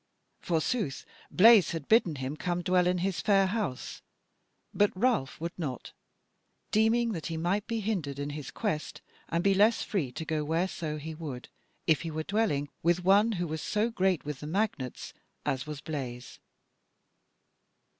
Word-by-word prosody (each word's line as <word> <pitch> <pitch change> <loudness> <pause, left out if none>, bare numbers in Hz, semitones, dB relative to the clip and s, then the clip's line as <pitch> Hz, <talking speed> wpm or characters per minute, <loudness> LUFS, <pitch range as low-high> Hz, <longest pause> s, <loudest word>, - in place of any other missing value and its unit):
Forsooth 165 - -1 0.2
Blaise 215 -2 +6
had 160 -4 -5
bidden 220 -8 +4
him 130 +2 -4
come 175 +2 -2
dwell 180 0 +3
in 180 0 +2
his 195 -3 -1
fair 195 -2 +4
house, 190 - -3 0.7
but 205 0 +4
Ralph 215 - +1
would 170 +2 -3
not, 135 -7 -4 0.8
deeming 225 +2 +3
that 165 -7 -4
he 165 - -3
might 185 +6 0
be 230 -2 -2
hindered 180 -10 -2
in 145 +1 -3
his 145 -2 -6
quest 150 +1 -3 0.3
and 170 +1 0
be 195 - +4
less 215 +4 +4
free 160 -12 -2
to 160 - -5
go 155 -1 -1
whereso 160 -1 -1
he 160 +2 -6
would, 150 -6 -7 0.4
if 160 -3 +3
he 165 - -4
were 155 0 -3
dwelling 195 -8 0
with 175 +2 +2
one 205 +5 +5
who 175 -3 -1
was 160 -1 -4
so 215 +3 0
great 190 -7 +1
with 150 -3 -4
the 150 - -7
magnates 170 - -2 0.3
as 130 +2 -1
was 150 -1 -6
Blaise. 130 -5 -6
170 Hz, 165 wpm, -29 LUFS, 150-200 Hz, 0.8 s, Blaise